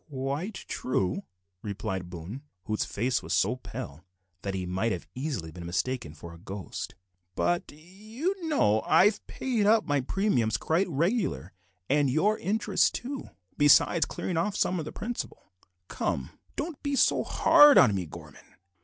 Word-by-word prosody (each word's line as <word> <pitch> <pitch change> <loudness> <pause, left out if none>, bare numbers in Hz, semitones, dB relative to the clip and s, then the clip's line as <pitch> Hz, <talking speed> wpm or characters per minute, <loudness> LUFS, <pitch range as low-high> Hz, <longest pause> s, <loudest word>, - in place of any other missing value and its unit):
"Quite 140 +9 -4
true," 95 -6 -1 0.4
replied 95 -3 -4
Boone, 90 +9 -7 0.2
whose 110 0 -1
face 120 +5 -1
was - - -4
so - - +2
pale 70 +4 -8 0.4
that 100 -1 -3
he 95 -1 -3
might 95 +6 -1
have 90 -3 -4
easily 130 - -4
been 85 +2 -9
mistaken 90 - -2
for 85 +2 -10
a 85 - -13
ghost, 95 +1 -6 0.4
"but 175 0 0
you 215 - -5
know 110 - +3
I 185 - +6
have 210 - +1
paid 235 -6 0
up 220 0 +4
my 145 -1 +1
premiums 130 - +1
quite 175 +4 0
regular, 145 - -1 0.3
and 145 0 +3
your 200 +11 +2
interest 210 +5 +1
too, 270 +2 -5 0.3
besides 145 +2 +5
clearin' 175 - -3
off 195 +4 0
some 185 -2 +1
of 155 - -4
the - - -6
principal. 230 - -6 0.3
Come, 65 - -2 0.2
don't 305 -1 -4
be 285 -1 -1
hard 295 -1 +6
on 110 -6 +7
me, 95 -3 -2
Gorman. - - -13
140 Hz, 155 wpm, -28 LUFS, -, 0.4 s, on